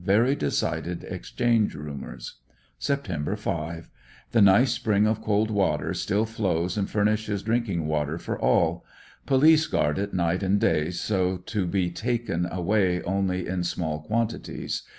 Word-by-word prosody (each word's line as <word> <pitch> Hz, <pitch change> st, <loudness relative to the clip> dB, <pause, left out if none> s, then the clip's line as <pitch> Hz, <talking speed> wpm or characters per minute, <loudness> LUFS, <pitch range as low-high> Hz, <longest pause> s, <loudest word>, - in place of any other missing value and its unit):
Very 110 Hz, +8 st, +3 dB
decided 80 Hz, -, -2 dB
ex -, -, -7 dB
change 115 Hz, -6 st, +2 dB
rumors. 75 Hz, -2 st, -7 dB, 0.4 s
Sept. 100 Hz, -, -2 dB
5. 85 Hz, -4 st, -4 dB, 0.2 s
— -, -, -26 dB
The 115 Hz, -, +4 dB
nice 100 Hz, +6 st, +6 dB
spring 105 Hz, -1 st, +2 dB
of 110 Hz, 0 st, 0 dB
cold 105 Hz, 0 st, +1 dB
water 100 Hz, -2 st, 0 dB
still 105 Hz, +3 st, 0 dB
flows 90 Hz, -6 st, -1 dB
and 100 Hz, -2 st, -1 dB
furnishes 105 Hz, -1 st, 0 dB
drinking 110 Hz, -7 st, 0 dB
water 75 Hz, 0 st, -1 dB
for -, -, -4 dB
all; -, -, +2 dB, 0.4 s
police 155 Hz, +4 st, +5 dB
guard 75 Hz, +3 st, 0 dB
it 100 Hz, 0 st, -2 dB
night 85 Hz, 0 st, 0 dB
and 100 Hz, +1 st, +2 dB
day 75 Hz, -3 st, +2 dB
so 95 Hz, 0 st, 0 dB
to 90 Hz, +1 st, -3 dB
be 90 Hz, -1 st, 0 dB
taken 115 Hz, -5 st, -1 dB
away 90 Hz, 0 st, +1 dB
only 95 Hz, -1 st, -1 dB
in 90 Hz, -1 st, -1 dB
small 80 Hz, -3 st, -2 dB
quantities. 115 Hz, +7 st, -2 dB
95 Hz, 150 wpm, -26 LUFS, 85-110 Hz, 0.4 s, nice